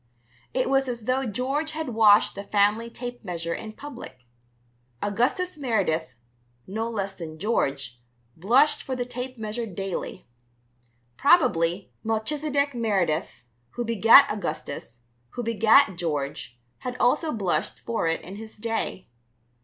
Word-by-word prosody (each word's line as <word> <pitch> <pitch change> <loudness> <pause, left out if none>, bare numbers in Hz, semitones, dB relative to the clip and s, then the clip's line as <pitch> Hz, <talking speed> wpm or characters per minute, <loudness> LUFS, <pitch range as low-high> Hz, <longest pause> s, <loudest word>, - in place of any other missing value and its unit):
It 255 - 0
was 270 0 +2
as 235 -3 -4
though 255 +1 0
George 270 +8 -1
had 315 -3 -3
washed 215 -3 +5
the 200 - -6
family 210 +3 +2
tape 245 0 -7
measure 170 -3 -3
in 215 +3 -7
public. 240 - -10 0.7
Augustus 250 - 0
Meredith, 175 - 0 0.5
no 220 +4 -3
less 200 -4 -3
than 160 -4 -8
George, 135 - -1 0.3
blushed 245 - +3
for 260 - -4
the 245 -1 -2
tape 250 +1 -6
measure 220 +1 -4
daily. 195 -1 -5 0.9
Probably, 190 - +3
Melchizedek 280 +6 0
Meredith, 195 - -1 0.3
who 240 - -2
begat 225 0 +7
Augustus, 140 - -5 0.3
who 245 - -3
begat 225 -2 +4
George, 140 -7 -3 0.2
had 250 -1 -5
also 305 +6 +2
blushed 185 -8 -1
for 230 -7 -1
it 165 - 0
in 190 +3 -9
his 220 0 -10
day. 225 -3 -3
220 Hz, 130 wpm, -25 LUFS, 185-250 Hz, 0.9 s, begat